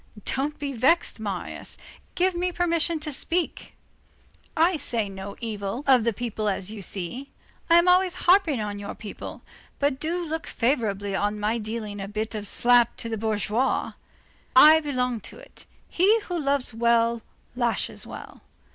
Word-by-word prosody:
Don't 285 +3 -1
be 285 -1 -4
vexed, 265 +4 +2
Marius, 200 -5 -5 0.4
give 370 0 +2
me 355 +1 -1
permission 335 -2 +1
to 300 0 -4
speak; 330 +5 -3 0.8
I 340 +3 +4
say 230 -8 -2
no 195 +1 -8
evil 215 +2 -4
of 260 -4 +5
the 235 - +3
people 220 -1 -3
as 195 0 -2
you 215 -2 -7
see, 195 +9 -3 0.4
I 335 - +6
am 345 +1 +5
always 365 0 +4
harping 350 - +4
on 205 -1 -4
your 205 0 -6
people, 210 -2 -8 0.3
but 280 -2 0
do 340 +3 -2
look 320 0 -4
favorably 210 -6 -1
on 205 +1 -1
my 215 +3 0
dealing 215 -2 -5
a 195 - -5
bit 215 +2 -4
of 210 -1 -4
a - - -4
slap 240 +2 +4
to 230 - -4
the 225 - -2
bourgeoisie. 220 +3 0 0.6
I 310 +4 +9
belong 250 -5 -1
to - - -11
it. - - -14 0.2
He 410 +6 +3
who 355 -3 -4
loves 280 -4 0
well 235 0 +2 0.3
lashes 240 -2 -1
well. - - -10
240 Hz, 165 wpm, -25 LUFS, 215-315 Hz, 0.8 s, I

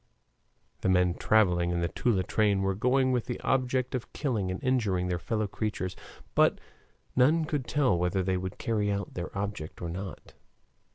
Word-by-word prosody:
The - - 0
men 90 -1 +4
traveling 90 -4 +3
in 85 0 0
the 85 - +1
Toula 100 -1 +1
train 100 0 +2
were 95 0 +1
going 130 +5 +2
with 125 -2 0
the 125 - -3
object 130 -1 0
of 125 -3 -4
killing 110 -10 -1
and 95 - -3
injuring 105 -9 +1
their 90 -1 -1
fellow 110 +1 -1
creatures, 95 -3 -3 0.4
but - - +4 0.6
none 155 +6 +4
could 145 -5 -2
tell 135 -10 +2
whether 90 +2 0
they 95 0 0
would 95 0 -4
carry 105 -3 0
out 100 -2 -3
their 85 -1 -4
object 100 -6 -4
or 85 - -4
not. 95 +2 -7
100 Hz, 175 wpm, -29 LUFS, 90-125 Hz, 0.6 s, men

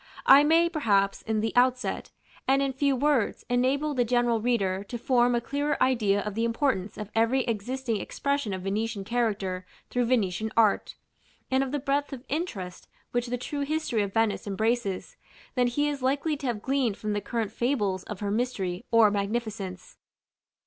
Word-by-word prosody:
I 275 +2 +8
may, 325 +3 +4
perhaps, 205 - +1
in 220 -1 -1
the 225 0 -1
outset, 255 +1 +1 0.4
and 270 +1 +3
in 270 -1 -1
few 275 +1 +1
words, 275 -4 +1
enable 270 +5 +1
the 250 -3 +2
general 240 -1 +1
reader 200 -5 0
to 240 - -5
form 245 0 +2
a - - +2
clearer 285 +5 -1
idea 220 -6 +2
of 210 0 -4
the 225 +3 -1
importance 230 -4 0
of 210 -1 -6
every 230 +4 +3
existing 230 0 -2
expression 280 -6 -2
of 185 -1 -4
Venetian 210 +1 -2
character 205 -5 -1 0.3
through 245 -1 +1
Venetian 220 -3 0
art, 220 -3 +3 0.6
and 265 +1 +3
of 265 - -4
the 290 - 0
breadth 280 +1 -1
of 255 -1 -8
interest 225 - -4 0.2
which 245 0 -1
the 245 +1 -2
true 285 +4 -4
history 280 -6 0
of 200 -1 -2
Venice 225 -1 0
embraces, 220 - -1 0.4
than 250 -2 +2
he 290 +5 0
is 290 -2 -3
likely 280 +4 +1
to 275 -2 -4
have 225 -4 -2
gleaned 260 -6 0
from 215 -1 -3
the 205 - -1
current 225 -3 -2
fables 215 -6 0
of 210 -2 -7
her 200 -1 -1
mystery 210 -5 -2
or 225 -3 +5
magnificence. 205 -2 -4
235 Hz, 175 wpm, -27 LUFS, 210-265 Hz, 0.6 s, I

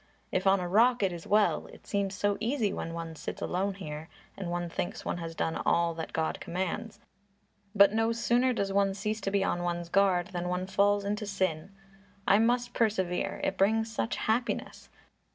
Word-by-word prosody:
"If 185 +1 0
on 195 0 +5
a 180 - -2
rock 230 +5 +4
it 190 -2 +1
is 170 - -8
well. 210 0 +2
It - - -15
seems 200 -1 -1
so 205 +1 +1
easy 225 -2 0
when 165 - -4
one 165 -1 -5
sits - - -6
alone 190 +2 -1
here, 155 -4 -7 0.3
and 190 -3 -5
one 175 0 -2
thinks 170 - -4
one - - -2
has 165 -1 -6
done 160 +1 -1
all 170 0 +2
that 160 0 -6
God 160 -1 -1
commands, 190 +4 -3 0.8
but 200 0 +7
no 225 +1 +2
sooner 240 +2 +2
does 200 -5 -1
one 195 -1 +2
cease 215 +2 -2
to 195 - -1
be 195 0 +1
on 175 - 0
one's 175 -1 -2
guard 185 -2 +3
than 180 -1 -3
one 180 +1 -1
falls 200 +1 +2
into 210 +1 -2
sin. 185 -5 -1 0.6
I 200 - +6
must 240 +1 +1
persevere; 190 -6 0
it - - -1
brings 220 +3 +2
such 225 - -1
happiness! 235 +3 -2
195 Hz, 190 wpm, -29 LUFS, 175-215 Hz, 0.8 s, but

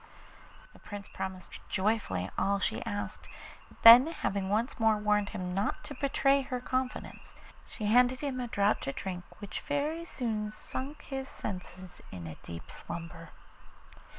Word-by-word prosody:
The - - -17
Prince 205 -1 -8
promised 185 -1 -6
joyfully 190 - 0
all 200 0 +2
she 200 - -1
asked; 205 0 -4 0.6
then 240 +5 +12
having 200 -11 -2
once 225 +6 0
more 220 -1 +4
warned 210 -1 +2
him 180 -1 -4
not 195 +3 -1
to 290 - -7
betray 275 -1 +3
her 255 -1 -3
confidence, 255 +1 -3 0.3
she 215 - -5
handed 245 +4 +4
him 275 -3 -2
a 245 - -2
draught 205 -2 +2
to 135 - -2
drink 180 +1 -4
which 205 -3 -6
very 300 +3 -1
soon 220 -8 -2
sunk 265 +7 -6
his 270 -1 -5
senses 185 -1 -7
in 90 -2 -7
a 80 - -6
deep 85 -1 -9
slumber. 165 -1 -7
210 Hz, 150 wpm, -31 LUFS, 190-255 Hz, 0.6 s, then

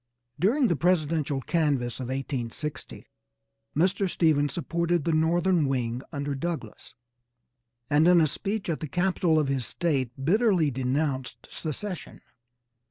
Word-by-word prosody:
During 250 +9 +3
the 175 - +2
presidential 155 -3 +1
canvass 140 -6 0
of 130 - -4
1860 135 +1 -5 0.7
Mr. 190 +4 +2
Stephens 150 -4 +2
supported 170 -1 -1
the 165 - 0
northern 165 0 +2
wing 125 -2 -1
under 145 -2 -3
Douglass, 135 -5 -5 0.9
and 150 +5 +4
in 180 -1 +7
a 160 - +5
speech 200 +7 -3
at 165 -3 -1
the 155 - -4
capitol 175 0 +1
of 150 -2 +2
his 135 -4 -1
State 140 -7 -1
bitterly 185 -4 +3
denounced 130 +1 -2
secession. 180 +4 -5
155 Hz, 125 wpm, -27 LUFS, 135-175 Hz, 0.9 s, in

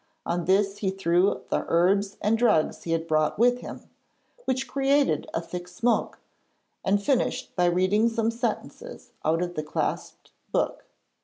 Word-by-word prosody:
On 175 0 -1
this 195 +2 +2
he 195 - 0
threw 190 0 +1
the - - 0
herbs 195 +4 +2
and 210 +2 +2
drugs 225 -9 +2
he 165 - -3
had 165 0 -1
brought 155 -1 +1
with 245 +2 +3
him, - - -8 0.6
which 260 0 -1
created 275 - +1
a - - -1
thick 175 +1 -7
smoke, 225 +7 0 0.7
and 200 +1 +2
finished 255 +4 -1
by 180 - +2
reading 185 +6 +3
some 225 0 0
sentences 245 - -5
out 165 +2 +1
of 175 0 -4
the 155 - -2
clasped 150 0 -4 0.2
book. - - -1
195 Hz, 155 wpm, -26 LUFS, 175-230 Hz, 0.7 s, with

